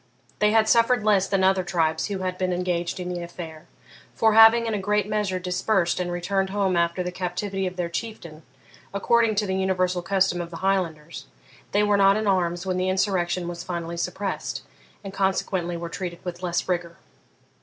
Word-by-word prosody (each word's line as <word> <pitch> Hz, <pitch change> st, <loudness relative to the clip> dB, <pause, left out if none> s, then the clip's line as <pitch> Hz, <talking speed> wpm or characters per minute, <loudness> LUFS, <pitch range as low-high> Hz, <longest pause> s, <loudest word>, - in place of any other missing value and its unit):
They 210 Hz, -, +4 dB
had 220 Hz, 0 st, +3 dB
suffered 230 Hz, 0 st, +4 dB
less 205 Hz, -3 st, +3 dB
than 195 Hz, -1 st, +1 dB
other 190 Hz, 0 st, +3 dB
tribes 160 Hz, -3 st, 0 dB
who 200 Hz, -2 st, -3 dB
had 185 Hz, 0 st, -2 dB
been 185 Hz, -1 st, 0 dB
engaged 175 Hz, -1 st, -2 dB
in 180 Hz, -, -4 dB
the 175 Hz, -1 st, -4 dB
affair; 170 Hz, -2 st, -9 dB, 0.5 s
for, 220 Hz, -1 st, +3 dB
having 225 Hz, +1 st, +7 dB
in 225 Hz, -, -1 dB
a 210 Hz, -, -1 dB
great 205 Hz, +1 st, 0 dB
measure 210 Hz, -3 st, -1 dB
dispersed 185 Hz, 0 st, 0 dB
and 175 Hz, -1 st, -2 dB
returned 190 Hz, +2 st, -1 dB
home 195 Hz, -2 st, 0 dB
after 170 Hz, +1 st, +1 dB
the 180 Hz, -, -3 dB
captivity 190 Hz, +2 st, -3 dB
of 180 Hz, -, -6 dB
their 175 Hz, -1 st, -2 dB
Chieftain, 170 Hz, -4 st, -6 dB, 0.5 s
according 225 Hz, +2 st, +2 dB
to 210 Hz, +1 st, +1 dB
the 190 Hz, -, -2 dB
universal 185 Hz, -1 st, 0 dB
custom 190 Hz, -1 st, +1 dB
of 170 Hz, -, -6 dB
the 165 Hz, -, -8 dB
Highlanders, 170 Hz, -5 st, -2 dB, 0.4 s
they 205 Hz, +1 st, +3 dB
were 205 Hz, -1 st, +3 dB
not 195 Hz, 0 st, +5 dB
in 215 Hz, -, -2 dB
arms 175 Hz, -2 st, 0 dB
when 185 Hz, -1 st, -1 dB
the 185 Hz, 0 st, 0 dB
insurrection 185 Hz, -2 st, 0 dB
was 175 Hz, 0 st, -5 dB
finally 170 Hz, -1 st, -4 dB
suppressed, 180 Hz, +3 st, -3 dB, 0.4 s
and 195 Hz, -1 st, -7 dB
consequently 190 Hz, -3 st, -1 dB
were 170 Hz, 0 st, -5 dB
treated 175 Hz, 0 st, -6 dB
with 175 Hz, 0 st, -5 dB
less 175 Hz, -1 st, -1 dB
rigour. 175 Hz, -2 st, -2 dB
185 Hz, 190 wpm, -24 LUFS, 175-200 Hz, 0.5 s, having